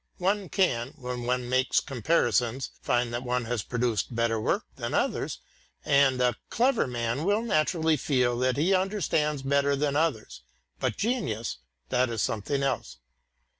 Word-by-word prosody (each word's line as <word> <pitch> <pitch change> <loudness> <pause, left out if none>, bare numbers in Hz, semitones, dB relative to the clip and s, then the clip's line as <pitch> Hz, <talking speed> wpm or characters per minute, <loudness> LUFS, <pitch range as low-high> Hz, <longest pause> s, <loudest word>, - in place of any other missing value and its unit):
One 195 0 0
can, 135 - 0
when 125 -3 -5
one 125 0 0
makes 130 +1 +2
comparisons, 130 -2 0
find 120 -1 0
that 120 - -2
one 125 -1 -1
has 120 -1 -1
produced 120 0 -1
better 115 -1 +1
work - - 0
than - - -3
others, - - 0 0.5
and 140 -3 +4
a 125 -1 +3 0.2
clever 245 - +2
man 120 +3 -2
will 205 +5 +2
naturally 160 -5 +2
feel 125 -3 +1
that 130 +1 +1
he 170 +7 +3
understands 165 -7 0
better 140 +1 +2
than 140 0 0
others, 145 - -1 0.4
but - - -1
genius, 120 - -2 0.3
that 125 0 +2
is 115 -2 -1
something 135 +7 -1
else. 135 - -2
130 Hz, 150 wpm, -27 LUFS, 120-155 Hz, 0.5 s, and